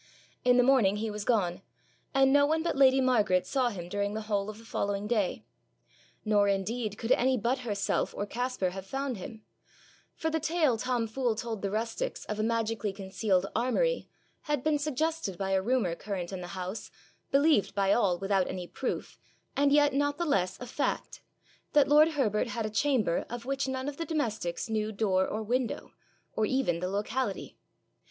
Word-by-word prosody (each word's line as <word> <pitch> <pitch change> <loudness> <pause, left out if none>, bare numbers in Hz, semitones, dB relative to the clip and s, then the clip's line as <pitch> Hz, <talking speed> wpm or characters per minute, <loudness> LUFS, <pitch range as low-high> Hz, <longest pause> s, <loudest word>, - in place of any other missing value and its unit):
In 250 0 +5
the 250 - +6
morning 245 -7 +4
he 215 +1 -2
was 210 0 -4
gone, 195 -7 +1 0.5
and 270 -1 +4
no 285 0 +5
one 320 +1 +1
but 340 - -1
lady 270 -1 +5
Margaret 215 -8 +3
saw 260 -3 +1
him 180 -6 -6
during 205 +2 -2
the 220 - -2
whole 205 -1 -1
of 215 - -7
the 230 - -14
following 200 -2 -2
day. 210 -4 0 0.8
Nor 205 -1 +3
indeed 205 +2 -1
could 225 +2 -3
any 255 +1 +4
but 240 +4 0
herself 210 -5 -1
or 205 - -1
Caspar 245 -4 -2
have 190 +1 -8
found 270 0 -3
him, 215 +3 -9 0.7
for 320 - -2
the 320 - 0
tale 315 -4 +2
Tom 240 +1 -1
Fool 235 +1 -1
told 225 -2 -4
the 200 - -1
rustics 230 - -3
of 210 0 -4
a - - +1
magically 225 -2 0
concealed 190 -1 0
armoury 255 - +1 0.4
had 295 -3 0
been 305 -1 +2
suggested 305 - -1
by 195 0 -2
a 190 0 +3
rumour 225 -5 +1
current 190 0 -5
in 185 - -4
the 175 - -6
house, 185 +4 -5 0.4
believed 285 -5 +3
by 200 0 +3
all 190 -7 +2
without 195 0 +1
any 180 -1 -4
proof, 255 +8 -4 0.4
and 280 0 +3
yet 290 -1 +5
not 285 +1 +1
the 345 - -1
less 190 - 0
a 250 - -6
fact, 260 +4 -3 0.5
that 290 -2 +5
lord 305 +2 +6
Herbert 240 -5 +1
had 225 0 -3
a 215 - -3
chamber 220 -6 +1
of 240 0 -6
which 275 0 -1
none 260 0 -3
of 290 -1 -4
the 330 - -3
domestics 225 - -2
knew 215 -1 -1
door 195 -3 +1
or 220 +1 -3
window, 245 +2 -2 0.4
or 215 - +1
even 255 -10 +1
the 180 - -2
locality. 215 +6 -2
225 Hz, 190 wpm, -29 LUFS, 200-270 Hz, 0.8 s, the